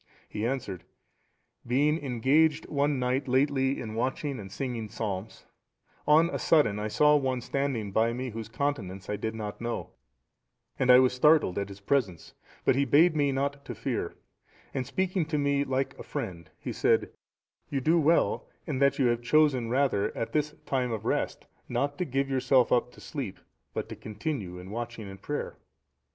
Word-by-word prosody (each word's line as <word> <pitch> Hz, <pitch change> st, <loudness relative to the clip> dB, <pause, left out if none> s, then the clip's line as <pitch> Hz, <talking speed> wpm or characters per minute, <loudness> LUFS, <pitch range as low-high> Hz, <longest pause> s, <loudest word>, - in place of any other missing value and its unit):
He 105 Hz, +2 st, -2 dB
answered, 115 Hz, -9 st, -3 dB, 0.8 s
"Being 145 Hz, +5 st, +2 dB
engaged 140 Hz, +5 st, +2 dB
one 145 Hz, 0 st, +1 dB
night 130 Hz, +2 st, 0 dB
lately 135 Hz, +1 st, +2 dB
in 110 Hz, -3 st, -5 dB
watching 130 Hz, +3 st, -2 dB
and 95 Hz, -2 st, -9 dB
singing 120 Hz, -3 st, -4 dB
psalms, 105 Hz, 0 st, -5 dB, 0.6 s
on 155 Hz, +3 st, +6 dB
a -, -, -2 dB
sudden 110 Hz, -11 st, +3 dB
I 105 Hz, -, -2 dB
saw 150 Hz, +7 st, +4 dB
one 130 Hz, -3 st, +1 dB
standing 125 Hz, -4 st, -2 dB
by 110 Hz, +3 st, +2 dB
me 125 Hz, +1 st, -4 dB
whose 110 Hz, 0 st, -6 dB
countenance 115 Hz, -8 st, -3 dB
I -, -, 0 dB
did 110 Hz, +2 st, -3 dB
not 105 Hz, -1 st, -6 dB
know, 120 Hz, 0 st, -3 dB, 0.9 s
and 130 Hz, -, +1 dB
I 125 Hz, -, +10 dB
was 130 Hz, 0 st, +4 dB
startled 145 Hz, -, +4 dB
at 100 Hz, 0 st, -3 dB
his 100 Hz, 0 st, -11 dB
presence, 100 Hz, -7 st, -1 dB, 0.3 s
but -, -, +4 dB
he 140 Hz, -, +3 dB
bade 155 Hz, +5 st, +5 dB
me 145 Hz, -2 st, +2 dB
not 140 Hz, +1 st, -2 dB
to -, -, -7 dB
fear, -, -, -3 dB, 0.6 s
and 130 Hz, -2 st, -2 dB
speaking 185 Hz, -1 st, 0 dB
to 155 Hz, -2 st, -1 dB
me 140 Hz, -1 st, +2 dB
like 135 Hz, 0 st, -1 dB
a -, -, -6 dB
friend 90 Hz, -, -5 dB
he -, -, -5 dB
said, -, -, +2 dB, 0.6 s
'You 140 Hz, -, -1 dB
do 160 Hz, +6 st, +3 dB
well 160 Hz, +2 st, +2 dB, 0.2 s
in 145 Hz, -5 st, -2 dB
that 140 Hz, 0 st, +3 dB
you 135 Hz, -, +2 dB
have 120 Hz, -1 st, +2 dB
chosen 130 Hz, -3 st, +3 dB
rather 130 Hz, -5 st, +1 dB
at 115 Hz, -, -2 dB
this 150 Hz, 0 st, 0 dB
time 130 Hz, -3 st, 0 dB
of 110 Hz, -2 st, -4 dB
rest -, -, -1 dB, 0.2 s
not 145 Hz, 0 st, -1 dB
to 180 Hz, -, 0 dB
give 135 Hz, -1 st, 0 dB
yourself 130 Hz, -1 st, +3 dB
up 125 Hz, 0 st, +2 dB
to -, -, -15 dB
sleep, -, -, -5 dB, 0.3 s
but -, -, -4 dB
to -, -, -6 dB
continue 110 Hz, -, -5 dB
in 90 Hz, +2 st, -9 dB
watching 115 Hz, -1 st, -5 dB
and 95 Hz, 0 st, -10 dB
prayer. 145 Hz, -, -4 dB
130 Hz, 180 wpm, -28 LUFS, 110-145 Hz, 0.9 s, I